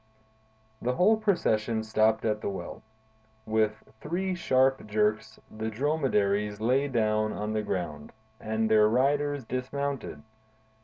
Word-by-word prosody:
The 125 Hz, +1 st, 0 dB
whole 205 Hz, +8 st, +5 dB
procession 115 Hz, -, 0 dB
stopped 110 Hz, 0 st, +2 dB
at 105 Hz, -1 st, 0 dB
the -, -, -2 dB
well. 95 Hz, -, -7 dB, 0.6 s
With 110 Hz, 0 st, 0 dB, 0.2 s
three 185 Hz, +4 st, -2 dB
sharp 135 Hz, -8 st, +2 dB
jerks, 110 Hz, +1 st, 0 dB, 0.2 s
the 110 Hz, +1 st, -3 dB
dromedaries 105 Hz, -6 st, 0 dB
lay 130 Hz, +6 st, +2 dB
down 110 Hz, -4 st, +1 dB
on 105 Hz, +1 st, -3 dB
the 110 Hz, -, 0 dB
ground, 85 Hz, -8 st, -4 dB, 0.3 s
and 110 Hz, +1 st, -1 dB
their 110 Hz, -1 st, +5 dB
riders 140 Hz, +3 st, +1 dB
dismounted. 135 Hz, +2 st, -4 dB
110 Hz, 120 wpm, -28 LUFS, 110-135 Hz, 0.6 s, whole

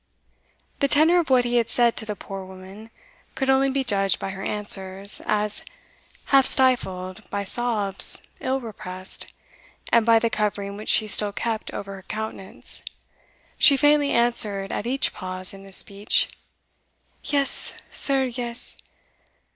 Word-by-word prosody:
The 280 Hz, -, +3 dB
tenor 315 Hz, +5 st, +5 dB
of 335 Hz, -, -2 dB
what 255 Hz, -2 st, +4 dB
he 240 Hz, 0 st, +1 dB
had 230 Hz, -1 st, +1 dB
said 240 Hz, -1 st, +2 dB
to 220 Hz, -, -4 dB
the 210 Hz, -, -3 dB
poor 195 Hz, -1 st, -8 dB
woman 190 Hz, +4 st, -12 dB, 0.5 s
could 265 Hz, 0 st, +1 dB
only 270 Hz, +1 st, +3 dB
be 270 Hz, 0 st, 0 dB
judged 195 Hz, -5 st, +1 dB
by 195 Hz, -, -5 dB
her 195 Hz, 0 st, -8 dB
answers, 195 Hz, -1 st, 0 dB
as, 210 Hz, 0 st, +1 dB, 0.7 s
half 270 Hz, -1 st, +6 dB
stifled 190 Hz, -7 st, +1 dB
by 200 Hz, 0 st, -3 dB
sobs 210 Hz, -2 st, 0 dB, 0.2 s
ill 260 Hz, +1 st, -1 dB
repressed, 185 Hz, -6 st, -6 dB, 0.6 s
and 235 Hz, -, +6 dB
by 230 Hz, 0 st, +5 dB
the 225 Hz, 0 st, 0 dB
covering 200 Hz, -1 st, -2 dB
which 210 Hz, +1 st, -7 dB
she 220 Hz, -, +4 dB
still 210 Hz, 0 st, +3 dB
kept 225 Hz, +1 st, -3 dB
over 195 Hz, 0 st, -6 dB
her 195 Hz, -, -10 dB
countenance, 215 Hz, -1 st, -4 dB, 0.8 s
she 280 Hz, -, +6 dB
faintly 290 Hz, +1 st, +3 dB
answered 215 Hz, -6 st, +2 dB
at 220 Hz, -, -3 dB
each 270 Hz, +2 st, 0 dB
pause 185 Hz, -1 st, -5 dB
in 195 Hz, 0 st, -12 dB
his 195 Hz, -1 st, -4 dB
speech 200 Hz, +1 st, 0 dB, 0.9 s
"Yes, 280 Hz, -2 st, -1 dB, 0.2 s
sir, 270 Hz, -1 st, +1 dB
yes! 240 Hz, -1 st, -1 dB
215 Hz, 145 wpm, -24 LUFS, 195-255 Hz, 0.9 s, half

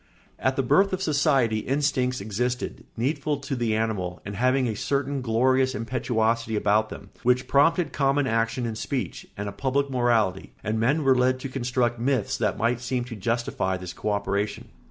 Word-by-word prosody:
] -, -, -34 dB
At 130 Hz, -, -4 dB
the 135 Hz, -, +1 dB
birth 195 Hz, +10 st, +3 dB
of 185 Hz, -, -1 dB
society 140 Hz, -, +2 dB
instincts 130 Hz, -1 st, 0 dB
existed, 125 Hz, +5 st, -3 dB
needful 145 Hz, +4 st, 0 dB
to 140 Hz, 0 st, -4 dB
the 115 Hz, -3 st, 0 dB
animal 105 Hz, -6 st, -2 dB
and 100 Hz, +1 st, -5 dB
having 130 Hz, +4 st, +2 dB
a 110 Hz, -, -2 dB
certain 140 Hz, +4 st, -1 dB
glorious 130 Hz, +3 st, +2 dB
impetuosity 115 Hz, -1 st, 0 dB
about 105 Hz, +1 st, +2 dB
them, 100 Hz, -, -10 dB
which 125 Hz, +1 st, +2 dB
prompted 160 Hz, +3 st, +3 dB
common 140 Hz, 0 st, +2 dB
action 115 Hz, 0 st, 0 dB
and 115 Hz, -1 st, -3 dB
speech, 135 Hz, -3 st, -4 dB
and 100 Hz, +1 st, -3 dB
a -, -, -3 dB
public 140 Hz, +3 st, -1 dB
morality, 115 Hz, -7 st, +1 dB
and 110 Hz, +1 st, -1 dB
men 140 Hz, +7 st, +2 dB
were 135 Hz, -1 st, +5 dB
led 130 Hz, +1 st, +2 dB
to 135 Hz, -, -4 dB
construct 125 Hz, -2 st, -1 dB
myths 130 Hz, +1 st, 0 dB
that 110 Hz, -6 st, 0 dB
might 120 Hz, +1 st, 0 dB
seem 125 Hz, 0 st, -1 dB
to 120 Hz, -1 st, -7 dB
justify 115 Hz, -3 st, -1 dB
this 90 Hz, -1 st, -7 dB
co 105 Hz, -, -3 dB
operation. 100 Hz, 0 st, -2 dB
125 Hz, 180 wpm, -25 LUFS, 110-135 Hz, -, were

